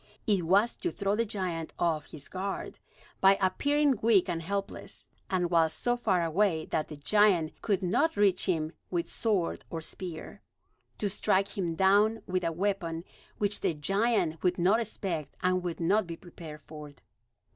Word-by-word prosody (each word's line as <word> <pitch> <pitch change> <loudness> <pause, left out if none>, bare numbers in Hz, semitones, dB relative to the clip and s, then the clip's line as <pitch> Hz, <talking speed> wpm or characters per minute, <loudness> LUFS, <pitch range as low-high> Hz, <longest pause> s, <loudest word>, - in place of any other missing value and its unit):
It 200 -6 +1
was 200 +6 +3
to 350 - -2
throw 200 -8 -1
the 230 +2 +1
giant 180 -6 -4
off 160 -3 0
his 145 -3 -11
guard, 195 +1 -5 0.4
by 195 0 +6
appearing 280 +7 +2
weak 215 -5 +4
and 165 - -2
helpless; 200 +3 -5 0.2
and 180 -2 0
while 165 -2 +4
so 200 +10 0
far 195 -8 +1
away 165 -1 +1
that 155 - 0
the 150 - -8
giant 175 +1 +2
could 200 -2 0
not 265 - +1
reach 200 -3 +3
him 160 -2 0 0.2
with 175 -2 -1
sword 200 -7 -1
or 165 - -4
spear, 165 0 -7 0.6
to 210 - 0
strike 200 0 +1
him 175 -5 -2
down 205 +5 +3
with 185 0 -1
a 165 - 0
weapon 170 -2 -2 0.3
which 205 0 -1
the 165 - 0
giant 195 0 0
would 180 -1 +1
not 190 +6 +3
expect 180 -9 -4
and 185 0 +2
would 175 -2 -4
not 190 +4 +2
be 165 -1 -6
prepared 165 -4 -11
for. 150 -1 -10
185 Hz, 165 wpm, -29 LUFS, 165-205 Hz, 0.6 s, by